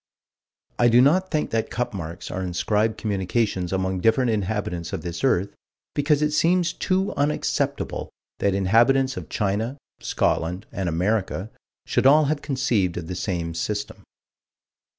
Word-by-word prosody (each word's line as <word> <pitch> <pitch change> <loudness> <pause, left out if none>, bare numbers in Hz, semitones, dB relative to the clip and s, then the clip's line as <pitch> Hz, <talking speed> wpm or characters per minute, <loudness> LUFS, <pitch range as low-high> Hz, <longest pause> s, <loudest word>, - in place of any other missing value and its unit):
I 120 - +5
do 120 +1 +5
not 175 +9 +4
think 155 -2 -1
that 115 0 0
cup 120 0 -2
marks 85 -1 -6
are 95 - -3
inscribed 105 +5 0
communications 100 -2 -1
among 95 -1 -1
different 115 +4 +3
inhabitants 100 -5 -2
of - - -4
this 85 +4 -5
earth, 100 -7 +2 0.4
because 145 +1 +2
it 150 - +1
seems 170 +3 +2
too 190 +1 0
unacceptable 145 +1 -1 0.3
that 100 -1 +1
inhabitants 120 +7 +3
of - - -7
China, 110 +6 -1 0.2
Scotland, 90 +3 -1
and 95 -3 -2
America 95 +3 -1 0.3
should - - +2
all 150 +3 +7
have 145 +1 -1
conceived 125 - 0
of 85 - -4
the 90 +2 -5
same 85 -3 -2
system. 105 +5 -3
105 Hz, 145 wpm, -24 LUFS, 95-135 Hz, 0.4 s, all